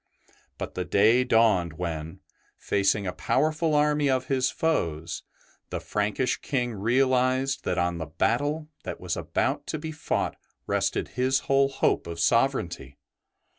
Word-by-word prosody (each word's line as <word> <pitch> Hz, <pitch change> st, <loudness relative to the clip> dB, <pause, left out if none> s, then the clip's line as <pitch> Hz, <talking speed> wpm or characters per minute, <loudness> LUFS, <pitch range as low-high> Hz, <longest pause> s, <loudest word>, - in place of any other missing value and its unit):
But -, -, -5 dB
the 90 Hz, -, -2 dB
day 110 Hz, +7 st, +4 dB
dawned 110 Hz, -9 st, +3 dB
when, 80 Hz, -1 st, -5 dB, 0.4 s
facing 100 Hz, 0 st, +1 dB
a 90 Hz, -, -2 dB
powerful 155 Hz, 0 st, +1 dB
army 150 Hz, -1 st, +3 dB
of 130 Hz, -1 st, 0 dB
his 130 Hz, -1 st, +2 dB
foes, 85 Hz, -, -1 dB, 0.5 s
the -, -, -3 dB
Frankish 105 Hz, +5 st, -1 dB
King 125 Hz, -4 st, -2 dB
realized 130 Hz, +4 st, +1 dB
that 90 Hz, -, 0 dB
on 85 Hz, -1 st, 0 dB
the 80 Hz, -, -4 dB
battle 145 Hz, -, 0 dB, 0.2 s
that -, -, -6 dB
was -, -, -3 dB
about 145 Hz, +2 st, -1 dB
to 155 Hz, -, -2 dB
be 155 Hz, +1 st, -5 dB
fought 155 Hz, -, -2 dB, 0.3 s
rested -, -, 0 dB
his 130 Hz, +1 st, +1 dB
whole 135 Hz, 0 st, +3 dB
hope 135 Hz, -, 0 dB
of 85 Hz, 0 st, -6 dB
sovereignty. 90 Hz, -, +1 dB
125 Hz, 140 wpm, -26 LUFS, 90-135 Hz, 0.5 s, day